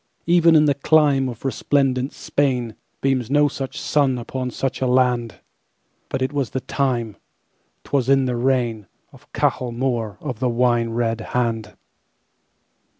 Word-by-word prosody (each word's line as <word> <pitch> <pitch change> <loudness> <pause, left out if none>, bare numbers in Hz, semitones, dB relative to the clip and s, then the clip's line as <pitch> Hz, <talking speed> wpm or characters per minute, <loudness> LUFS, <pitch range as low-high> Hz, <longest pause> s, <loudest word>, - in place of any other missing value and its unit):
Even 170 -1 +5
in 155 -1 +6
the 145 - +3
climeOf 140 -4 +2
resplendent 135 0 0
Spain, 125 -5 -1 0.3
Beams 130 -4 0
no 145 +1 +4
such 135 -2 -5
sun 140 -4 +1
upon 125 +1 -4
such 135 +2 -3
a 130 - +1
land; 125 -2 +1 0.7
But 130 - -2
it 130 - -2
was 140 -5 -1
the 130 - -3
time,'T 120 -7 -5
was 135 -2 +1
in 135 -1 +4
the 125 -1 -1
reign, 120 -4 0 0.3
Of - - -19
Cahal 125 -2 0
Mór 115 -4 -2
of 120 -4 -5
the 125 -1 +1
Wine 120 -1 +1
red 115 -1 -1
Hand. 115 -3 -2
130 Hz, 145 wpm, -21 LUFS, 120-135 Hz, 0.7 s, in